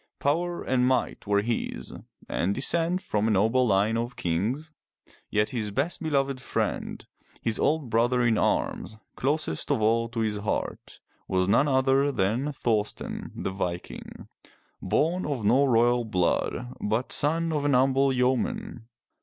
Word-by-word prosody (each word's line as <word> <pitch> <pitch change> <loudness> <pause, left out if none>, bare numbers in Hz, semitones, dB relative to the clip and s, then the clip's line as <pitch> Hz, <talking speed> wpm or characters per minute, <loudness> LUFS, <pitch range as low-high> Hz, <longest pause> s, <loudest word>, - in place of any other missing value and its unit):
Power 170 +5 -1
and 125 -1 +2
might 130 -4 0
were 100 0 +2
his, 115 +1 -3 0.3
and 100 +3 -1
descent 170 +7 +1
from 105 +1 0
a - - +2
noble 110 +5 +3
line 105 +2 +2
of 120 +1 -3
kings, 110 - -2 0.6
yet 105 0 +1
his 110 -4 -2
best 140 - -2
beloved 140 -4 0
friend, - - -3 0.4
his 115 -1 -1
old 150 -6 +1
brother 120 +2 +2
in 115 -2 +3
arms, 110 +1 -1 0.2
closest 150 +4 -1
of 140 -5 +2
all 115 +2 +2
to 115 -1 -3
his 110 -2 0
heart, 105 +1 -4 0.3
was 90 -1 +1
none 135 +8 +4
other 135 +1 +3
than 120 +5 0
Thor'sten 110 -6 -2
the - - -3
Viking, 90 -2 -5 0.5
born 175 +5 +1
of 135 -8 -3
no 130 +7 +4
royal 120 -1 +3
blood, 110 +5 -1
but 110 +5 -1
son 165 +3 +1
of 150 -2 0
an 145 -1 +2
humble 135 +2 +3
yeoman. 130 - -1
125 Hz, 145 wpm, -27 LUFS, 110-140 Hz, 0.6 s, none